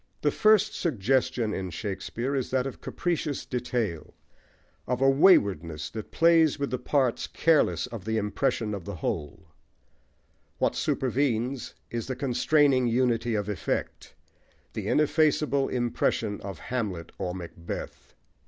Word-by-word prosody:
The - - +3
first 215 -1 +4
suggestion 130 - 0
in 95 -1 -3
Shakespeare 110 - -4
is 130 -3 -1
that 130 0 +1
of 135 - -6
capricious 160 -5 -2
detail, 120 -9 -3 0.7
of 125 0 -1
a 135 - +4
waywardness 100 - +3
that 110 -1 -7
plays 165 -2 +4
with 140 0 -2
the 125 - -1
parts 130 -5 0
careless 165 -2 +2
of 115 -5 -8
the 110 +2 -1
impression 105 +1 -1
of 100 -4 -5
the 100 - -5
whole; 80 -2 -4 1.1
what - - +1
supervenes 130 -1 -1 0.2
is 115 -1 -3
the 130 - -3
constraining 135 0 +3
unity 120 -1 +1
of 105 -1 -1
effect, 100 -7 -3 0.6
the - - -4
ineffaceable 150 -2 +2
impression, 115 -3 -1
of 95 -3 -6
Hamlet 100 -8 -4
or 90 0 -3
Macbeth. 85 -2 -8
120 Hz, 130 wpm, -27 LUFS, 105-140 Hz, 1.1 s, first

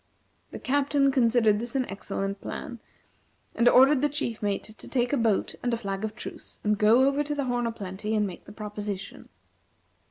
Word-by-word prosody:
The - - -7
Captain 280 0 +2
considered 230 -4 +3
this 240 +3 -5
an 260 -2 +1
excellent 195 0 -4
plan, 240 -2 -6 0.7
and 240 +1 +4
ordered 265 +1 +6
the 295 - +2
chief 280 -6 -3
mate 205 -1 -1
to 215 0 -12
take 245 0 0
a - - +5
boat 225 -6 +1
and 245 - -1
a - - -4
flag 195 -2 -4
of 215 0 -3
truce, - - -7
and 210 0 +2
go 220 +5 +5
over 280 +1 +1
to 295 0 -3
the 285 - -1
"Horn 245 -1 0
o' - - -1
Plenty," 210 0 -4
and 210 -1 +2
make 185 -3 -8
the - - -11
proposition. 205 -2 -6
230 Hz, 195 wpm, -27 LUFS, 210-260 Hz, 0.7 s, ordered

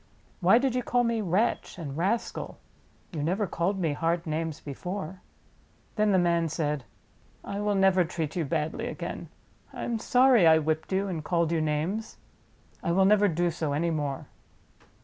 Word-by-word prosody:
Why 190 +5 +6
did 260 0 +1
you 250 - 0
call 245 0 +1
me 230 -1 0
'wretch' 200 +4 0
and 145 -6 -6
'rascal'? 195 +8 -2 0.6
You 155 - -3
never 185 +8 0
called 180 +2 -1
me 165 -5 0
hard 165 +3 -1
names 160 0 -3
before." 180 +5 -6 0.7
Then 215 -1 +2
the 190 - +4
man 170 -2 +2
said: 150 -4 -2 0.6
"I 200 - -4
will 205 0 0
never 190 -1 +4
treat 160 -2 -4
you 175 - 0
badly 160 - -2
again. 245 - -6 0.4
I - - -6
am 235 -2 -2
sorry 245 -5 +5
I 160 0 +7
whipped 155 +2 -1
you 195 +1 +1
and 170 -5 -4
called 170 0 +1
you 165 -1 +1
names. 155 +9 -2 0.6
I 170 - -1
will 190 +2 +4
never 205 +1 +5
do 175 0 +1
so 155 -3 -2
any 165 +4 0
more. 145 -4 -3
175 Hz, 170 wpm, -28 LUFS, 160-205 Hz, 0.7 s, I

